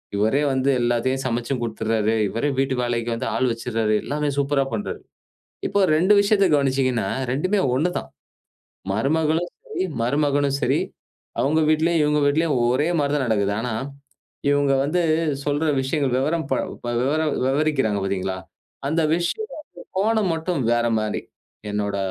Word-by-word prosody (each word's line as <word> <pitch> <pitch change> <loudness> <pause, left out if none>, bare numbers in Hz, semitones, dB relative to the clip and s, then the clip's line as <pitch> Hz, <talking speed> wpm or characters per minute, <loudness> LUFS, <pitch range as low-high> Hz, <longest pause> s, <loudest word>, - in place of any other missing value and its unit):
இவரே 110 +8 +2
வந்து 130 +1 +1
எல்லாத்தையும் 120 +3 0
சமைச்சும் 120 +1 -1
குடுத்துர்றாரு. 110 -1 0
இவரே 115 +9 -1
வீட்டு 135 -1 +1
வேலைக்கு 120 -1 -1
வந்து 130 +3 -3
ஆள் 130 -1 +2
வச்சிர்றாரு. 115 -2 -1
எல்லாமே 150 0 -1
சூப்பரா 140 -1 +1
பண்றாரு." 105 - -4 0.7
இப்ப 200 -1 +2
2 185 +5 +4
விஷயத்தை 200 -1 +3
கவனிச்சீங்கன்னா, 130 -6 +1 0.2
2மே 185 +10 +1 0.2
ஒண்ணுதான். 175 +7 -1 0.8
மருமகளும் 160 - +1 0.2
சரி 440 - -2 0.2
மருமகனும் 140 +1 +1
சரி, - - +2 0.6
அவுங்க 155 +3 +2
வீட்லேயும், 160 +1 +2
இவுங்க 150 0 +2
வீட்லேயும் 150 -1 +2
ஒரே 140 +6 +1
மாரிதான் 145 -1 +1
நடக்குது. 100 -3 +1
ஆனா, 120 -1 -3 0.8
இவுங்க 145 -1 +3
வந்து 175 +5 +1 0.4
சொல்ற 145 +2 0 0.2
விஷயங்கள் 135 -1 0
வெவரம் 155 +5 0
ப - - +4 0.3
ப - - -3
வெவரம் 155 +4 +1 0.2
வெவரிக்குறாங்க 135 -7 +1
பாத்தீங்களா? 95 -1 -2 0.5
அந்த 160 +3 +1
விஷயத்தின் 280 - -5
கோணம் 215 -2 +2
மட்டும் 160 -1 -2
வேற 120 0 +2
மாரி. 105 -1 -2 0.5
என்னோட 105 -1 -2
140 Hz, 135 wpm, -23 LUFS, 120-160 Hz, 0.8 s, 2